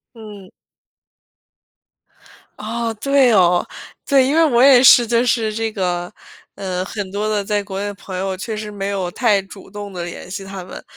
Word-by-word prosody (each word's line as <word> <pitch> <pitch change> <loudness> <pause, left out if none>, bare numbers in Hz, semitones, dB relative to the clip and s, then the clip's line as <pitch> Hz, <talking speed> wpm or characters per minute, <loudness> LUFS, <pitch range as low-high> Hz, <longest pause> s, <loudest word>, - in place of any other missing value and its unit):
嗯。 210 -4 -12 2.1
哦， 230 +2 -3
对 270 +2 +3
哦。 180 -4 +3 0.4
对， 270 -2 +4
因 285 - 0
为 330 - +5
我 245 -6 +3
也 260 -2 +7
是 240 -2 +7
就 235 +1 +1
是 225 -3 0
这 225 +1 -2
个， 180 -3 -3 0.4
呃 185 -2 -3
很 200 0 -6
多 205 +2 -3
的 205 -2 -1
在 205 0 -1
国 195 -1 -6
内 205 - -3
的 205 - -4
朋 190 -1 -8
友， 190 0 -2
确 215 +4 -5
实 210 0 -6
没 200 -1 -5
有 190 -3 -2
太 210 -4 +2
主 195 0 -14
动 205 -1 -8
地 175 -1 -5
联 175 +1 -8
系 195 +1 -6
他 195 -1 -8
们。 180 - -10
205 Hz, 195 characters per minute, -19 LUFS, 190-230 Hz, 2.1 s, 也